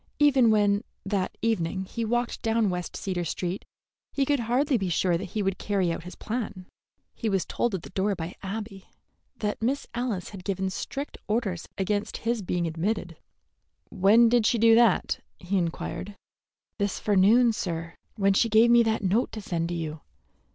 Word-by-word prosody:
Even 270 Hz, -5 st, +5 dB
when, 205 Hz, 0 st, +3 dB, 0.2 s
that 195 Hz, -1 st, -1 dB
evening, 190 Hz, -4 st, 0 dB
he 230 Hz, +5 st, -4 dB
walked 240 Hz, +2 st, -1 dB
down 225 Hz, -3 st, +1 dB
West 180 Hz, -1 st, -4 dB
Cedar 185 Hz, -3 st, -2 dB
Street, 180 Hz, +3 st, -3 dB, 0.5 s
he 275 Hz, -, +1 dB
could 285 Hz, 0 st, +2 dB
hardly 255 Hz, +5 st, +1 dB
be 195 Hz, -5 st, 0 dB
sure 175 Hz, +1 st, +2 dB
that 170 Hz, -, -2 dB
he 210 Hz, -, +1 dB
would 190 Hz, -1 st, -1 dB
carry 195 Hz, -4 st, 0 dB
out 165 Hz, -, -5 dB
his 180 Hz, -, -8 dB
plan. 210 Hz, -5 st, -4 dB, 0.5 s
He 225 Hz, -, -2 dB
was 195 Hz, -3 st, +1 dB
told 240 Hz, -4 st, -1 dB
at 175 Hz, -, -5 dB
the -, -, -10 dB
door 195 Hz, +1 st, 0 dB
by 165 Hz, 0 st, -5 dB
Abby 195 Hz, 0 st, -6 dB, 0.5 s
that 210 Hz, 0 st, -2 dB
Miss 270 Hz, +5 st, 0 dB
Alice 235 Hz, -6 st, -2 dB
had 195 Hz, -3 st, -10 dB
given 190 Hz, 0 st, -2 dB
strict 280 Hz, +9 st, -5 dB
orders 210 Hz, -6 st, -1 dB
against 205 Hz, +2 st, -1 dB
his 235 Hz, -1 st, +1 dB
being 175 Hz, -2 st, -1 dB
admitted. 170 Hz, +2 st, -2 dB, 0.8 s
"When 215 Hz, +5 st, +5 dB
did 230 Hz, -1 st, +3 dB
she 240 Hz, -, +2 dB
do 230 Hz, 0 st, +6 dB
that?" 230 Hz, -3 st, +4 dB, 0.2 s
he 190 Hz, +2 st, -1 dB
inquired. 180 Hz, +3 st, -4 dB, 0.6 s
"This 200 Hz, -1 st, -1 dB
forenoon, 215 Hz, +4 st, +4 dB
sir, 165 Hz, -5 st, -4 dB, 0.2 s
when 195 Hz, -2 st, +3 dB
she 230 Hz, +4 st, +3 dB
gave 225 Hz, +2 st, +5 dB
me 240 Hz, 0 st, +7 dB
that 220 Hz, -2 st, 0 dB
note 200 Hz, +6 st, +1 dB
to 220 Hz, -, -5 dB
send 170 Hz, -4 st, -2 dB
to 175 Hz, -, -2 dB
you. 160 Hz, -2 st, -4 dB
205 Hz, 180 wpm, -27 LUFS, 185-230 Hz, 0.8 s, me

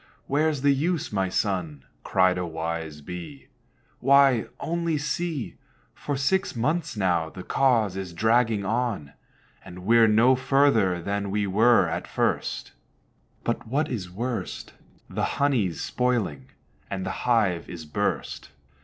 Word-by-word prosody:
where's 150 Hz, 0 st, +1 dB
the 140 Hz, -1 st, +5 dB
use, 160 Hz, +4 st, -1 dB
my 95 Hz, -2 st, 0 dB
son?" 90 Hz, -9 st, -2 dB, 0.2 s
Cried 95 Hz, -1 st, +3 dB
a -, -, -1 dB
wise 80 Hz, -2 st, -4 dB
Bee; 90 Hz, -, -9 dB, 0.5 s
"Why, 135 Hz, -3 st, +4 dB
only 170 Hz, -1 st, -1 dB
see, 150 Hz, -1 st, -3 dB, 0.4 s
For 145 Hz, -2 st, -4 dB
six 190 Hz, +7 st, 0 dB
months 155 Hz, +3 st, -1 dB
now 90 Hz, -5 st, +1 dB
the 90 Hz, -, -9 dB
cause 115 Hz, -8 st, +2 dB
is 95 Hz, -2 st, -5 dB
dragging 110 Hz, +2 st, +2 dB
on, 100 Hz, -, -2 dB, 0.5 s
And 90 Hz, +1 st, -11 dB
we're 115 Hz, +1 st, +6 dB
no 115 Hz, +5 st, +5 dB
further 130 Hz, -8 st, +3 dB
than 100 Hz, +1 st, -2 dB
we 105 Hz, +1 st, 0 dB
were 110 Hz, +5 st, +4 dB
at -, -, -4 dB
first; -, -, -1 dB, 0.7 s
But -, -, -2 dB
what 145 Hz, +6 st, 0 dB
is 100 Hz, -8 st, -4 dB
worst, 110 Hz, -1 st, -4 dB, 0.3 s
The -, -, -3 dB
honey's 125 Hz, -, +1 dB
spoiling, 110 Hz, -, -1 dB, 0.4 s
and 95 Hz, -1 st, -4 dB
the 95 Hz, -, -2 dB, 0.2 s
hive 100 Hz, -8 st, +2 dB
is 85 Hz, -3 st, -8 dB
burst. 75 Hz, -, -3 dB
110 Hz, 135 wpm, -25 LUFS, 90-135 Hz, 0.7 s, we're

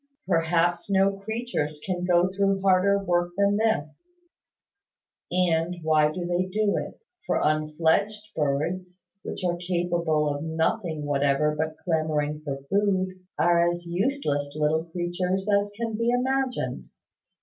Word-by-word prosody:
Perhaps 170 Hz, +1 st, +1 dB
no 195 Hz, 0 st, +3 dB
creatures 220 Hz, -9 st, -3 dB
can 180 Hz, -2 st, -2 dB
go 175 Hz, 0 st, +4 dB
through 195 Hz, 0 st, +2 dB
harder 195 Hz, +1 st, +4 dB
work 175 Hz, -2 st, 0 dB
than 200 Hz, 0 st, +3 dB
this; 215 Hz, -9 st, 0 dB, 1.3 s
and 175 Hz, -1 st, +1 dB
why 155 Hz, -1 st, +3 dB
do 175 Hz, +2 st, -4 dB
they 175 Hz, +1 st, 0 dB
do 205 Hz, +2 st, +1 dB
it? -, -, -4 dB, 0.3 s
For -, -, +1 dB
unfledged 160 Hz, +8 st, 0 dB
birds, 175 Hz, +5 st, -2 dB, 0.2 s
which 185 Hz, -, -5 dB
are 175 Hz, -1 st, 0 dB
capable 170 Hz, -3 st, 0 dB
of 145 Hz, 0 st, -2 dB
nothing 160 Hz, 0 st, -1 dB
whatever 145 Hz, +1 st, +1 dB
but 155 Hz, +1 st, -2 dB
clamouring 155 Hz, -3 st, 0 dB
for 140 Hz, -2 st, -5 dB
food, 190 Hz, -1 st, 0 dB, 0.2 s
are 170 Hz, 0 st, +4 dB
as 175 Hz, 0 st, -4 dB
useless 170 Hz, -, -1 dB
little 155 Hz, +1 st, +1 dB
creatures 180 Hz, +3 st, -2 dB
as 205 Hz, 0 st, +2 dB
can 230 Hz, -1 st, -2 dB
be 230 Hz, +2 st, 0 dB
imagined. 260 Hz, +1 st, -1 dB
175 Hz, 130 wpm, -26 LUFS, 155-195 Hz, 1.3 s, go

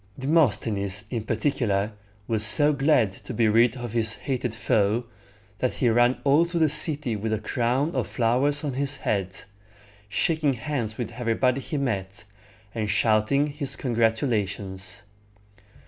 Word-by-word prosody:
Demosthenes, 110 Hz, -, +1 dB
in 115 Hz, -3 st, -3 dB
particular, 110 Hz, -3 st, 0 dB, 0.3 s
was 110 Hz, -2 st, 0 dB
so 145 Hz, +8 st, +6 dB
glad 135 Hz, -7 st, +2 dB
to 115 Hz, +5 st, -9 dB
be 115 Hz, 0 st, +3 dB
rid 115 Hz, +3 st, +3 dB
of 120 Hz, -3 st, -6 dB
his 115 Hz, -1 st, +1 dB
hated 125 Hz, -4 st, -3 dB
foe, 110 Hz, +2 st, +1 dB, 0.6 s
that 125 Hz, -, 0 dB
he 125 Hz, -, +1 dB
ran 120 Hz, +2 st, +3 dB
all 145 Hz, +4 st, +4 dB
through 170 Hz, -1 st, -2 dB
the 155 Hz, -, +4 dB
city 150 Hz, -5 st, +1 dB
with 110 Hz, +1 st, -3 dB
a 110 Hz, -, +1 dB
crown 120 Hz, +7 st, -1 dB
of 125 Hz, -7 st, -1 dB
flowers 125 Hz, -, +1 dB
on 145 Hz, -3 st, -2 dB
his 140 Hz, +2 st, 0 dB
head, 95 Hz, -7 st, -2 dB, 0.7 s
shaking 155 Hz, +4 st, +1 dB
hands 120 Hz, -3 st, -4 dB
with 120 Hz, -1 st, -4 dB
everybody 125 Hz, +2 st, 0 dB
he 150 Hz, -, -4 dB
met, 100 Hz, -9 st, -3 dB, 0.5 s
and 110 Hz, -2 st, -3 dB
shouting 110 Hz, +7 st, +2 dB
his 145 Hz, -1 st, -4 dB
congratulations. 110 Hz, -4 st, -1 dB
120 Hz, 145 wpm, -25 LUFS, 110-140 Hz, 0.7 s, so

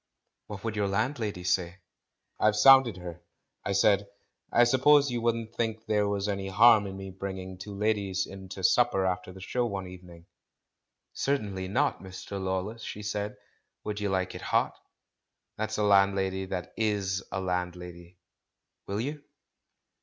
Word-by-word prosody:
"What 105 Hz, -2 st, -8 dB
would 110 Hz, -1 st, -3 dB
your 105 Hz, -1 st, 0 dB
landlady 110 Hz, -2 st, -2 dB
say?" 90 Hz, 0 st, 0 dB, 0.6 s
"I've 110 Hz, 0 st, +3 dB
sounded 130 Hz, 0 st, +7 dB
her. 90 Hz, -1 st, -8 dB, 0.4 s
I 100 Hz, -, -1 dB
said, 100 Hz, +1 st, +3 dB, 0.4 s
'I 120 Hz, -, +5 dB
suppose 135 Hz, +3 st, +5 dB
you 120 Hz, -1 st, -2 dB
wouldn't 115 Hz, -1 st, -1 dB
think 110 Hz, -1 st, -2 dB
there 105 Hz, -1 st, +1 dB
was 100 Hz, 0 st, -1 dB
any 100 Hz, -1 st, -2 dB
harm 105 Hz, +1 st, +6 dB
in 95 Hz, 0 st, -7 dB
my 95 Hz, 0 st, -7 dB
bring 95 Hz, 0 st, -5 dB
ing 95 Hz, 0 st, -8 dB
two 100 Hz, +1 st, -7 dB
ladies 100 Hz, -2 st, 0 dB
in 95 Hz, -1 st, -10 dB
to 95 Hz, 0 st, -7 dB
supper 110 Hz, -1 st, +3 dB
after 90 Hz, 0 st, -2 dB
the 95 Hz, -, -12 dB
show 125 Hz, +6 st, -1 dB
one 100 Hz, -3 st, -4 dB
evening?' 90 Hz, -2 st, -12 dB, 0.9 s
'Certainly 100 Hz, -9 st, -2 dB
not, 95 Hz, -, 0 dB
Mr. 95 Hz, +1 st, -7 dB
Lawless,' 95 Hz, +5 st, -3 dB
she 105 Hz, -, -7 dB
said. 105 Hz, 0 st, -3 dB, 0.5 s
'Would 105 Hz, -1 st, -4 dB
you 105 Hz, -1 st, -1 dB
like 95 Hz, -1 st, -1 dB
it -, -, -8 dB
hot?' -, -, +1 dB, 0.8 s
That's 110 Hz, 0 st, -3 dB
a 105 Hz, -, +1 dB
landlady 95 Hz, -1 st, +3 dB
that 90 Hz, -2 st, -5 dB
is 100 Hz, -4 st, -1 dB
a 95 Hz, -, -2 dB
landlady. 90 Hz, -1 st, -4 dB, 0.7 s
Will 100 Hz, +2 st, -2 dB
you?" 145 Hz, +3 st, -5 dB
100 Hz, 160 wpm, -28 LUFS, 95-110 Hz, 0.9 s, sounded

